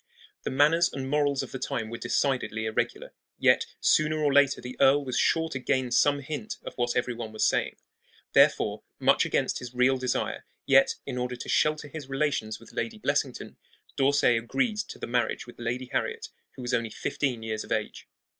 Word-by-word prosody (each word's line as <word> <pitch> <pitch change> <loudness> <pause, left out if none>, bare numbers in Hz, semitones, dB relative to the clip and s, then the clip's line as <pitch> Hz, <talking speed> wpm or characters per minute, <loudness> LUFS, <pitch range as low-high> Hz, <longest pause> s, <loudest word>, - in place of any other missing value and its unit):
The - - -3
manners 155 +5 +3
and 135 -1 -5
morals 145 -1 +1
of - - -9
the 130 - -5
time 110 -2 -3
were 115 - -4
decidedly 120 -3 0
irregular; 110 - -2 0.2
yet - - +3
sooner 155 0 +3
or 150 -2 +1
later 145 -1 +4
the 125 +1 -8
earl 140 +1 +5
was 130 -1 -3
sure 165 +4 +2
to 135 - -4
gain 130 0 0
some 145 +3 +3
hint 155 +10 -5
of - - -7
what 120 -1 -1
every 125 0 0
one 115 -2 -6
was 110 - 0
saying. - - +1 0.6
Therefore, - - +4 0.2
much - - +3
against - - 0
his 125 0 -9
real 130 +2 +3
desire, 125 -1 -2 0.2
yet - - +5
in 125 - -4
order 125 0 -2
to 120 - -8
shelter 155 -1 +1
his 145 -2 -8
relations 135 -6 -1
with 115 - -16
Lady 225 -1 -3
Blessington, 215 - -2 0.4
D'Orsay 135 -3 +3
agreed 215 - -1
to 210 - -5
the - - -5
marriage 120 0 -1
with 120 - -14
Lady 120 +2 -3
Harriet, - - -2 0.3
who 130 - -8
was 120 +1 -3
only 115 -2 0
fifteen 125 +1 -2
years 110 -1 -3
of - - -14
age. - - -3
130 Hz, 190 wpm, -27 LUFS, 120-145 Hz, 0.6 s, earl